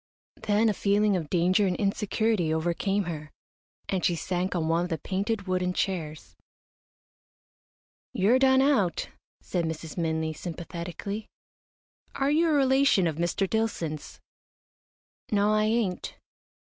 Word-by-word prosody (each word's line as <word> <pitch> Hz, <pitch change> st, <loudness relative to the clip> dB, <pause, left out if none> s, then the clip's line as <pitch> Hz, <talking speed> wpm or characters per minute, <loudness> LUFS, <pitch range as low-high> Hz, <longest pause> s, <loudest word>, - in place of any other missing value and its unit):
Then 210 Hz, +2 st, +2 dB
a 215 Hz, -, +3 dB
feeling 205 Hz, +1 st, +2 dB
of 160 Hz, -5 st, -3 dB
danger 185 Hz, +3 st, +3 dB
and 180 Hz, -, 0 dB
insecurity 200 Hz, -2 st, 0 dB
overcame 175 Hz, +5 st, 0 dB
her, 155 Hz, -4 st, -6 dB, 0.6 s
and 190 Hz, -2 st, -1 dB
she 175 Hz, -, +2 dB
sank 180 Hz, +2 st, -2 dB
on 165 Hz, -2 st, 0 dB
one 165 Hz, +1 st, +2 dB
of 175 Hz, -, -4 dB
the 165 Hz, -, -1 dB
painted, 200 Hz, +5 st, -2 dB
wooden 180 Hz, -1 st, 0 dB
chairs. 155 Hz, -, -3 dB, 1.8 s
"You're 220 Hz, +7 st, +3 dB
done 265 Hz, 0 st, +5 dB
out," 215 Hz, -12 st, +1 dB, 0.3 s
said 175 Hz, -2 st, -2 dB
Mrs. 160 Hz, 0 st, -5 dB
Minley, 160 Hz, -1 st, -1 dB
sympathetically. 175 Hz, +5 st, -6 dB, 0.9 s
"Are 275 Hz, +1 st, +1 dB
you 325 Hz, +2 st, +3 dB
a -, -, +2 dB
relation 265 Hz, -7 st, +4 dB
of 160 Hz, -2 st, -1 dB
Mr. 175 Hz, +3 st, 0 dB
Dillson's?" 180 Hz, -9 st, -3 dB, 1.1 s
"No, 210 Hz, 0 st, +3 dB
I 215 Hz, 0 st, +3 dB
ain't." 215 Hz, -4 st, -1 dB
185 Hz, 130 wpm, -27 LUFS, 170-215 Hz, 1.8 s, done